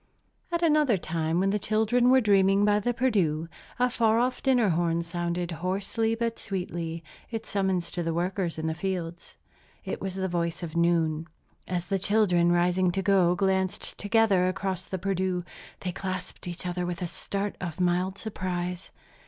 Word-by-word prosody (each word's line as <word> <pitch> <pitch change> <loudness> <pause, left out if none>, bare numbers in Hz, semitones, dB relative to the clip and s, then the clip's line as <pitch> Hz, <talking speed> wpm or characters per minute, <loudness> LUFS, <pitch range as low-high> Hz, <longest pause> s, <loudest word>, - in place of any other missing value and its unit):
At 340 0 0
another 300 - +4
time, 165 0 -1
when 195 +1 +2
the 210 - 0
children 220 +4 +2
were 260 0 +6
dreaming 200 -1 +4
by 210 0 +4
the 245 +4 0
Perdu, 195 -11 +1 0.3
a 250 +1 +3
far 225 -2 +2
off 250 +2 0
dinner 250 -6 +3
horn 170 0 +1
sounded, 175 +1 -3
hoarsely 195 +6 -1
but 230 0 -2
sweetly, 170 -3 -4 0.3
its 225 -2 -5
summons 190 -4 0
to 175 - -3
the 165 -1 -1
workers 175 +1 -1
in 160 - -3
the 160 - 0
fields. 175 -1 -4 0.5
It - - -4
was 190 -1 -3
the 190 0 -1
voice 170 -1 -2
of 165 -1 -6
noon. 165 -2 +2 0.4
As 175 -1 -2
the 195 +1 -1
children, 180 -4 +3
rising 175 +1 +3
to 195 - -1
go, 185 -3 +4
glanced 190 0 0
together 205 -4 +3
across 185 -1 -2
the 190 - -4
Perdu, 185 -1 -1 0.4
they 180 - -2
clasped 185 -1 -5
each 175 0 -4
other 180 0 -2
with 175 0 -3
a - - -1
start 200 +4 -3
of 175 -1 -5
mild 180 +2 +1
surprise. 180 -4 -4
185 Hz, 170 wpm, -27 LUFS, 175-205 Hz, 0.5 s, were